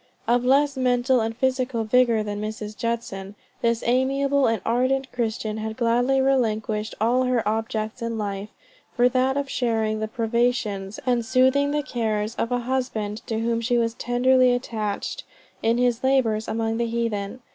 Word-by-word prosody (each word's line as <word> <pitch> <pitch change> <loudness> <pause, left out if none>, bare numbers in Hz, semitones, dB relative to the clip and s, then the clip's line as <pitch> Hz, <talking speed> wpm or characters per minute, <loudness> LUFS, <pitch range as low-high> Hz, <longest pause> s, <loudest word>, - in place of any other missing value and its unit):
Of 240 +1 +3
less 280 +3 +3
mental 250 0 +2
and 225 +1 -3
physical 255 -2 0
vigor 230 -1 +3
than 205 0 -4
Mrs. 215 0 -5
Judson, 210 -4 -4 0.3
this 235 -1 +1
amiable 275 +3 +2
and 225 -1 +1
ardent 260 +3 +1
Christian 220 -2 -2
had 220 0 -5
gladly 245 +2 +2
relinquished 220 -5 0
all 235 +4 +2
other 250 -4 +1
objects 220 +1 -2
in 230 -1 -3
life, 200 -1 -4 0.5
for 245 -1 +5
that 260 +2 +1
of 280 -1 -1
sharing 225 -4 0
the 220 - -2
privations 225 -4 -1
and 245 -2 +1
soothing 260 +4 +3
the 295 0 0
cares 220 -4 -2
of 230 - -2
a 245 - +2
husband 235 -5 -2
to 225 -1 -2
whom 230 0 0
she 240 +1 +1
was 230 -1 +1
tenderly 250 +1 +3
attached, 215 -4 -3 0.4
in 230 +1 +2
his 245 -1 +1
labors 240 -5 +2
among 225 0 -1
the 235 0 0
heathen. 230 -1 -2
235 Hz, 160 wpm, -24 LUFS, 220-255 Hz, 0.5 s, for